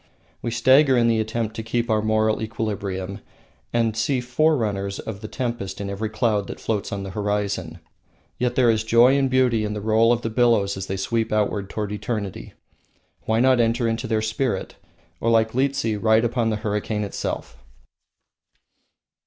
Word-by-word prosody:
We -, -, -2 dB
stagger 130 Hz, +4 st, +4 dB
in 120 Hz, -1 st, +3 dB
the 115 Hz, -1 st, +2 dB
attempt 110 Hz, 0 st, -2 dB
to -, -, -2 dB
keep 115 Hz, +1 st, -1 dB
our 110 Hz, -2 st, +2 dB
moral 110 Hz, 0 st, +1 dB
equilibrium, 100 Hz, -3 st, -4 dB, 0.5 s
and 115 Hz, -2 st, +1 dB
see 125 Hz, +4 st, 0 dB
forerunners 120 Hz, -7 st, 0 dB
of 105 Hz, -2 st, -7 dB
the 110 Hz, -, -6 dB
tempest 115 Hz, -7 st, -4 dB
in 100 Hz, -1 st, -4 dB
every 105 Hz, +2 st, -3 dB
cloud 110 Hz, -2 st, 0 dB
that -, -, -7 dB
floats 105 Hz, -3 st, -2 dB
on 100 Hz, -1 st, -3 dB
the 95 Hz, -, -6 dB
horizon. 100 Hz, -4 st, -2 dB, 0.6 s
Yet 125 Hz, 0 st, 0 dB
there 120 Hz, -3 st, +4 dB
is 110 Hz, -1 st, 0 dB
joy 115 Hz, +4 st, +5 dB
and 135 Hz, -1 st, +2 dB
beauty 125 Hz, -4 st, +2 dB
in 105 Hz, 0 st, -3 dB
the -, -, -3 dB
roll 110 Hz, +2 st, +3 dB
of 120 Hz, 0 st, 0 dB
billows 115 Hz, -5 st, +3 dB
as 95 Hz, 0 st, -5 dB
they 95 Hz, -, -3 dB
sweep 115 Hz, +3 st, -1 dB
outward 105 Hz, -2 st, 0 dB
toward 105 Hz, -2 st, -4 dB
eternity. 105 Hz, -2 st, -4 dB, 0.7 s
Why 110 Hz, +1 st, +2 dB
not 130 Hz, -1 st, +4 dB
enter 115 Hz, 0 st, +2 dB
into 115 Hz, +3 st, -2 dB
their 110 Hz, -1 st, 0 dB
spirit, 110 Hz, +3 st, -2 dB, 0.4 s
or, 115 Hz, -, 0 dB
like 110 Hz, -1 st, +3 dB
Liehtse, 130 Hz, -5 st, 0 dB
ride 110 Hz, +1 st, +4 dB
upon 120 Hz, -1 st, 0 dB
the 110 Hz, -, 0 dB
hurricane 105 Hz, 0 st, -1 dB
itself? 95 Hz, -9 st, -5 dB
110 Hz, 170 wpm, -23 LUFS, 105-120 Hz, 0.7 s, joy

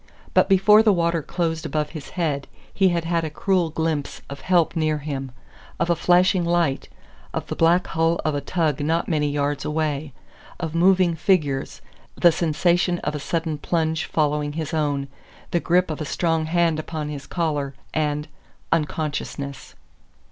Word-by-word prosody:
But -, -, +4 dB
before 210 Hz, +3 st, +6 dB
the 220 Hz, -1 st, +4 dB
water 170 Hz, -3 st, +1 dB
closed 165 Hz, +1 st, -2 dB
above 150 Hz, -1 st, -2 dB
his 150 Hz, -5 st, -8 dB
head 150 Hz, -5 st, -1 dB, 0.3 s
he 195 Hz, -2 st, +3 dB
had 170 Hz, -1 st, -1 dB
had 170 Hz, 0 st, 0 dB
a 160 Hz, -, -2 dB
cruel 185 Hz, 0 st, +1 dB
glimpse 155 Hz, -2 st, -2 dB
of 140 Hz, -1 st, -7 dB
help 175 Hz, -2 st, +2 dB
near 155 Hz, -2 st, +1 dB
him; 140 Hz, -3 st, -5 dB, 0.5 s
of 170 Hz, 0 st, +1 dB
a -, -, +3 dB
flashing 180 Hz, +2 st, +3 dB
light 170 Hz, -5 st, 0 dB, 0.5 s
of -, -, -2 dB
the -, -, -5 dB
black 175 Hz, +3 st, +3 dB
hull 165 Hz, +1 st, +1 dB
of 155 Hz, -, +1 dB
a 145 Hz, -, -1 dB
tug 155 Hz, -1 st, 0 dB
not 160 Hz, +3 st, 0 dB
many 150 Hz, -3 st, +1 dB
yards 145 Hz, -1 st, -1 dB
away 150 Hz, -1 st, -2 dB, 0.5 s
of 160 Hz, -3 st, -4 dB
moving 180 Hz, 0 st, +4 dB
figures 150 Hz, -6 st, 0 dB, 0.3 s
the 175 Hz, -, +5 dB
sensation 175 Hz, +2 st, +1 dB
of 150 Hz, -, -1 dB
a 150 Hz, -, -3 dB
sudden 160 Hz, +1 st, -2 dB
plunge 160 Hz, 0 st, 0 dB
following 150 Hz, -1 st, 0 dB
his 160 Hz, 0 st, -4 dB
own, 145 Hz, -3 st, 0 dB, 0.4 s
the 175 Hz, -, +2 dB
grip 180 Hz, 0 st, +2 dB
of 155 Hz, -, -5 dB
a -, -, -2 dB
strong 165 Hz, +1 st, 0 dB
hand 165 Hz, -1 st, +2 dB
upon 155 Hz, -1 st, -4 dB
his 145 Hz, -2 st, -7 dB
collar, 145 Hz, -5 st, -2 dB, 0.2 s
and 150 Hz, -1 st, -1 dB, 0.4 s
unconsciousness! 150 Hz, -3 st, -3 dB
160 Hz, 165 wpm, -23 LUFS, 150-170 Hz, 0.5 s, before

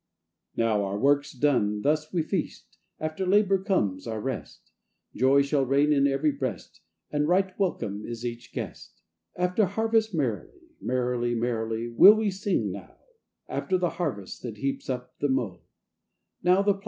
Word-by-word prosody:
] -, -, -39 dB
NOW 110 Hz, -3 st, +2 dB
our 100 Hz, +1 st, -2 dB
work's 140 Hz, +4 st, +2 dB
done, 115 Hz, -7 st, +1 dB
thus 155 Hz, +1 st, +1 dB
we 170 Hz, -3 st, 0 dB
feast, 170 Hz, +1 st, -4 dB, 0.2 s
After 155 Hz, +4 st, -3 dB
labour 195 Hz, 0 st, +3 dB
comes 105 Hz, -, 0 dB
our 110 Hz, -1 st, -3 dB
rest; 130 Hz, +2 st, -6 dB, 0.4 s
Joy 135 Hz, +2 st, +4 dB
shall 140 Hz, 0 st, +1 dB
reign 140 Hz, +3 st, +3 dB
in 140 Hz, -1 st, +4 dB
every 140 Hz, +2 st, +1 dB
breast, 130 Hz, -, -5 dB, 0.3 s
And 150 Hz, 0 st, +1 dB
right 185 Hz, +2 st, +2 dB
welcome 105 Hz, -, -1 dB
is 120 Hz, 0 st, -6 dB
each 120 Hz, 0 st, -6 dB
guest: -, -, -8 dB, 0.3 s
After 180 Hz, +4 st, +2 dB
harvest 220 Hz, +2 st, +1 dB
merrily, 155 Hz, -, -3 dB
Merrily, 125 Hz, -1 st, 0 dB
merrily, 115 Hz, -1 st, -2 dB
will 190 Hz, -, +8 dB
we 215 Hz, -2 st, 0 dB
sing 195 Hz, +1 st, -1 dB
now, -, -, -10 dB, 0.5 s
After 185 Hz, -, -1 dB
the 180 Hz, -1 st, 0 dB
harvest 105 Hz, -, -4 dB
that 115 Hz, -4 st, -6 dB
heaps 135 Hz, +5 st, -3 dB
up 125 Hz, -1 st, -5 dB
the 145 Hz, -, 0 dB
mow. 115 Hz, -10 st, -1 dB
140 Hz, 150 wpm, -27 LUFS, 115-180 Hz, 0.5 s, will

